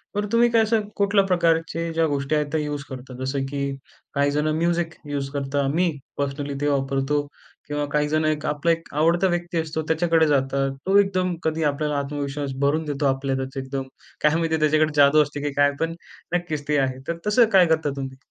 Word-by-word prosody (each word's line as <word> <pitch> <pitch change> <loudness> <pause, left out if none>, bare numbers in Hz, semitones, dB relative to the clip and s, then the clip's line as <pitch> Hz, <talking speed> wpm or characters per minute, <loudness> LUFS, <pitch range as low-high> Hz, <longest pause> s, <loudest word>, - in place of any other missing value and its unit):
बरं, 205 0 -1
तुम्ही 235 +1 +4
काय 230 -1 +4
असं 220 0 +2
कुठल्या 200 0 +3
प्रकारचे 165 -2 +1
ज्या 165 0 +2
गोष्टी 140 +1 -1
आहेत 150 -1 +1
त्या 160 - +1
यूज 145 -1 -4
करता? 130 0 -8
जसं 135 +1 -1
की 140 0 -3 0.5
काहीजण 145 +2 +1
म्युझिक 170 0 0 0.2
युज 140 -1 -2
करतात. 140 0 -1
मी 175 +1 +2 0.3
पर्सनली 140 0 -3
ते 145 - +1
वापरतो 135 +1 0 0.5
किंवा 145 0 -2
काहीजण 150 +1 +1
एक 155 -1 0
आपला 150 +3 +1
एक 165 0 -3
आवडता 170 +5 +3
व्यक्ती 175 -1 -2
असतो 160 0 -3
त्याच्याकडे 160 0 +3
जातात. 135 -1 +1 0.2
तो 195 +2 +4
एकदम 185 -3 +1
कधी 160 0 0
आपल्याला 150 0 0
आत्मविश्वास 140 0 -3
भरून 150 +3 +1
देतो 145 -1 -2
आपल्यातच 135 0 -1
एकदम 135 0 -3 0.4
काय 150 +1 +4
माहिती 160 -1 0
त्याच्याकडे 155 0 +3
जादू 145 +1 +6
असते 145 0 -7
की 145 - -1
काय 145 0 +4
पण 165 0 -1 0.4
नक्कीच 155 -5 -3
ते 150 0 +2
आहे. 130 -1 -1
तर 170 - -2
तसं 230 +3 +5
काय 185 -2 +7
करता 160 -2 +1
तुम्ही? 135 -1 -6
150 Hz, 185 wpm, -23 LUFS, 140-165 Hz, 0.5 s, काय